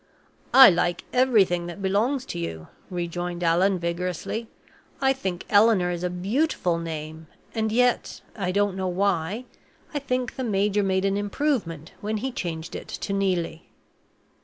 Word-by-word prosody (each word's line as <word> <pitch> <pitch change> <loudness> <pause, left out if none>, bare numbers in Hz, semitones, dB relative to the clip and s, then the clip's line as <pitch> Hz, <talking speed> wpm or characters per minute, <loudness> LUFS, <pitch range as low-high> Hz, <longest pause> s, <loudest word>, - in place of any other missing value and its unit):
"I 265 -5 +10
like 175 0 0
everything 205 -9 +3
that 175 +2 -7
belongs 220 +8 0
to - - -5
you," 80 -2 -5 0.2
rejoined 175 0 -3
Allan, 180 +3 +3
vigorously. 180 +6 -3 0.5
"I 270 0 +3
think 190 -9 -4
Eleanor 205 -4 +4
is 175 0 -4
a 180 - 0
beautiful 185 - 0
name; 160 -1 -6 0.3
and 220 -1 -1
yet, 245 +2 +1
I 185 -4 -1
don't 200 0 +1
know 190 -1 -2
why, 190 +4 0 0.5
I 290 - 0
think 255 -3 -2
the 260 - -2
major 205 -2 +1
made 190 -1 +1
an 195 0 +1
improvement 205 - -2
when 215 +1 -2
he 260 +5 -3
changed 165 -6 -5
it - - -7
to 200 - -4
Neelie." 180 -4 -1
190 Hz, 150 wpm, -25 LUFS, 175-220 Hz, 0.5 s, I